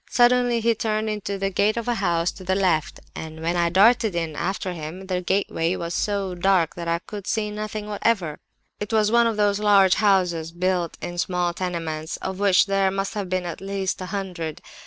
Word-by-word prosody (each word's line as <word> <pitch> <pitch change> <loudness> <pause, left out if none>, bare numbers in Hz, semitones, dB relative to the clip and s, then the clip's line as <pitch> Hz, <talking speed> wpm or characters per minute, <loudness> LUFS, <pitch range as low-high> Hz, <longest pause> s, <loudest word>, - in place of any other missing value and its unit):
Suddenly 245 -1 +3
he 230 +1 +3
turned 215 0 -1
into 200 -1 -3
the 195 0 -1
gate 205 +4 +2
of 235 - -3
a 240 - +2
house 175 -5 0
to 190 - -12
the 190 +1 0
left; 175 -6 +1 0.2
and 160 0 -7
when 170 +2 0
I 170 -1 +2
darted 215 +2 +4
in 165 -3 -2
after 185 +2 -2
him, 165 +3 -7
the 185 -1 -2
gateway 180 -2 0
was 170 -1 -4
so 200 -2 -1
dark 180 -2 +2
that 170 -1 -6
I 170 0 +1
could 200 +3 -9
see 210 -1 -1
nothing 215 0 -5
whatever. 200 -7 0 0.4
It 210 +1 -5
was 215 -1 +3
one 235 0 +5
of 225 -2 -1
those 205 -1 +2
large 200 -3 +5
houses 180 -6 +2
built 180 -1 -1
in 175 0 -4
small 180 -1 0
tenements, 165 -3 -4
of 190 0 -5
which 200 -3 +4
there 195 -1 +2
must 195 +1 -2
have 200 -3 -4
been 185 -1 -1
at 175 - -6
least 195 -1 -3
a 185 - -5
hundred. 180 -6 -5
190 Hz, 205 wpm, -23 LUFS, 175-210 Hz, 0.4 s, one